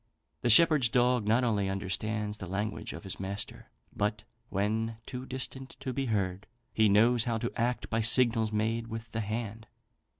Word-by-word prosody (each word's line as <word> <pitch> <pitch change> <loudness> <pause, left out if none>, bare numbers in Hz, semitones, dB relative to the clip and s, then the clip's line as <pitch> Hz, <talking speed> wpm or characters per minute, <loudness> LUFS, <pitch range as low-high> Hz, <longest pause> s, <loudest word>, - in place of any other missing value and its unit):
The 120 - +1
shepherd's 150 0 +6
dog 125 -2 +2
not 115 +4 +4
only 105 -5 +1
understands 105 +2 -2
the 95 - -6
language 105 +3 -3
of 80 - -8
his 95 - -6
master, 95 +1 -5 0.3
but, 105 +1 -1 0.3
when 110 +3 -1
too 130 0 -6
distant 130 0 -6
to 130 - -4
be 135 0 -1
heard, 100 -3 -1 0.3
he 110 -1 +4
knows 115 +3 +4
how 115 -2 0
to 120 +2 -2
act 120 +2 -1
by 115 0 +2
signals 115 -1 +3
made 110 +2 0
with 115 0 -7
the 115 - -2
hand." 110 +1 -4
110 Hz, 170 wpm, -30 LUFS, 105-120 Hz, 0.3 s, shepherd's